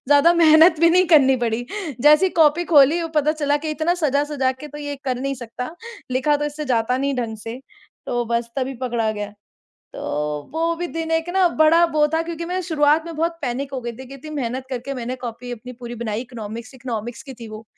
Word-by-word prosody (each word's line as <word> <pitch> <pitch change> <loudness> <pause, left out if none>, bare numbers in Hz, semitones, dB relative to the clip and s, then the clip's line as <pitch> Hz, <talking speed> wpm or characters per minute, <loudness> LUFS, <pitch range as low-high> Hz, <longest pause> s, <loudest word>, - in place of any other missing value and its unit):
ज़्यादा 290 +4 +6
मेहनत 320 0 +6
भी 335 - +6
नहीं 365 +1 +4
करनी 270 -5 +5
पड़ी। 235 +1 -1 0.3
जैसे 300 +7 +6
ही - - -1
कॉपी 320 +2 +4
खोली 300 +1 +5
वो 330 - -3
पता 300 +1 +3
चला 290 -2 0
कि 310 - -1
इतना 320 +3 0
सजा-सजा 285 -4 0
के 295 +3 -10
तो 295 +1 -9
ये 290 -1 -5
कर 255 -2 -1
नहीं 275 0 -2
सकता, 250 +4 -7 0.4
लिखा 265 +4 +2
तो 295 - -3
इससे 295 +1 -4
जाता 250 -1 +1
नहीं 280 0 0
ढँग 230 -3 -3
से, 225 +3 -7 0.5
तो 240 0 -1
बस 235 0 -1
तभी 265 0 -2
पकड़ा 235 -3 0
गया। 205 0 -5 0.6
तो - - -7 0.5
वो 330 +1 0
भी 350 - -3
दिन 325 0 -3
एक 325 +1 0
ना 370 -2 +4
बड़ा 320 +2 +5
वो 300 -1 +4
था 320 - +2
क्योंकि 335 0 -5
मैं 370 +1 -1
शुरुआत 305 -1 +3
में 335 - -6
बहुत 335 +2 0
पैनिक 270 +2 -3
हो 265 - -3
गई 235 -1 -5
थी, 260 +3 -11
कि 270 - -10
इतनी 275 +3 -10
मेहनत 260 -1 -3
करके 255 +2 -4
मैंने 250 0 -4
कॉपी 240 +1 -6
अपनी 245 +2 -8
पूरी 240 0 -6
बनाई 215 0 -2
इकोनॉमिक्स, 235 0 -8
इकोनॉमिक्स 240 -2 -5
की 270 -3 -10
थी 230 - -8
वो। 215 +1 -9
275 Hz, 225 wpm, -21 LUFS, 245-315 Hz, 0.6 s, ज़्यादा